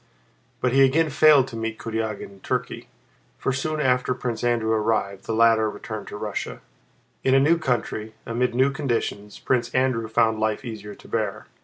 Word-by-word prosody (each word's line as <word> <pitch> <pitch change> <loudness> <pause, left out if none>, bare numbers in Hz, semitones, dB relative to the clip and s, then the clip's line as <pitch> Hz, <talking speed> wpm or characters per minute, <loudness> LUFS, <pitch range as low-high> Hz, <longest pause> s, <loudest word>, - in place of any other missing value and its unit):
But 125 -1 +1
he 135 - +5
again 150 +4 +3
failed 145 -2 +6
to 120 - -9
meet 115 0 -3
Kurágin 110 -2 -3
in 100 - -16
Turkey, - - -3 0.5
for 135 - -1
soon 155 +4 -2
after 125 -2 +1
Prince 120 -2 -4
Andrew 120 -2 +1
arrived, 105 -3 0
the 115 - -2
latter 115 -1 +4
returned 110 0 -7
to - - -7
Russia. 105 -1 -4 0.6
In 130 0 +4
a - - +6
new 160 +5 +4
country, 115 -6 -2
amid 120 +1 -1
new 130 +2 +3
conditions, 115 -7 -3
Prince 125 -3 0
Andrew 130 -3 +1
found 110 0 +2
life 110 +3 -1
easier 105 -3 -7
to - - -16
bear. 105 -4 -2
115 Hz, 175 wpm, -24 LUFS, 110-130 Hz, 0.6 s, failed